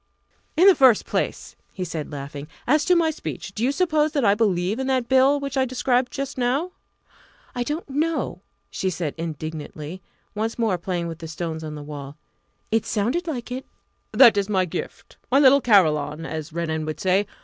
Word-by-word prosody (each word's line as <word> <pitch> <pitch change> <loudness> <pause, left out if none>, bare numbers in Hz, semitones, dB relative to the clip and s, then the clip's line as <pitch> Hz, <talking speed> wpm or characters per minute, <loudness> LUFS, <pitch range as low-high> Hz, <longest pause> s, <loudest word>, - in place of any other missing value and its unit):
"In 355 - +6
the 395 - +9
first 260 - +5
place," - - -3 0.2
he 185 - -4
said, 160 -4 -5
laughing, 140 0 -7 0.2
"as 300 +3 +3
to 360 - +4
my 330 -2 +3
speech, 195 -9 -7
do 220 - -3
you 260 - +3
suppose 310 -2 +1
that 280 -6 +1
I 200 - +5
believe 205 0 0
in 265 - -2
that 260 -3 +1
Bill 265 +3 +4
which 275 -1 -4
I 265 - +4
described 250 0 0
just 275 -1 -4
now?" 270 +9 0 0.8
"I 245 - -3
don't 295 +7 -3
know," 290 - -1 0.3
she 190 - -1
said 165 -4 -3
indignantly, 155 +1 -6 0.3
once 220 +2 -2
more 220 -6 +1
playing 175 -1 -2
with 165 -1 -7
the 165 - -7
stones 160 0 -5
on 155 -1 -6
the 150 - -7
wall. 145 -1 -8 0.5
"It 225 0 +2
sounded 245 - -1
like 250 -6 -4
it." 260 +1 -4 0.5
"That 235 -6 +7
is 200 0 0
my 190 -3 +2
gift 170 - -7
my 265 - +5
little 280 0 +6
carillon, 160 - +3
as 155 -1 -5
Renan 160 -1 -2
would 155 - -4
say. 190 +2 +2
210 Hz, 190 wpm, -23 LUFS, 165-270 Hz, 0.8 s, the